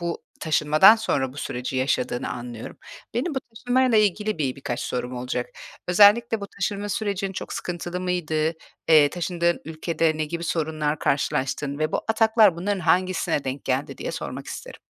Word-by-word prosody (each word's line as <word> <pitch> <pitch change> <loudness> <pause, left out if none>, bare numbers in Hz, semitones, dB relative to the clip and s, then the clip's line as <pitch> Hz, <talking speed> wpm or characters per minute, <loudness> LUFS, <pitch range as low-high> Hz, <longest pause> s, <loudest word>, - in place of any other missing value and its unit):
bu 170 -1 -3 0.2
taşınmadan 155 +7 +6
sonra 135 -12 -1
bu - - -15
süreci 125 -2 -4
yaşadığını 125 -1 0
anlıyorum. 120 -2 -7 0.4
Benim 290 +7 -1
bu - - +1
taşınmayla 245 +1 +2
ilgili 210 -1 +1
bir 135 -4 -1
birkaç 125 -3 -4
sorum 125 0 -3
olacak. 125 0 -3 0.4
Özellikle 210 +5 +5
bu 200 - -5
taşınma 200 +1 -3
sürecin 200 -2 -2
çok - - -6
sıkıntılı 175 0 -4
mıydı? 160 -3 0 0.4
Eee, 150 -3 +6
taşındığın 170 0 -1
ülkede 160 0 0
ne 155 - -1
gibi 170 +2 -5
sorunlar 155 -2 -1
karşılaştın 140 +1 -1
ve 155 0 -1
bu - - +1
ataklar 220 -4 +4
bunların 195 +2 -1
hangisine 180 -2 +1
denk 135 +1 -4
geldi 130 +2 -2
diye - - -4
sormak - - -6
isterim. - - -8
170 Hz, 155 wpm, -24 LUFS, 145-200 Hz, 0.4 s, taşınmadan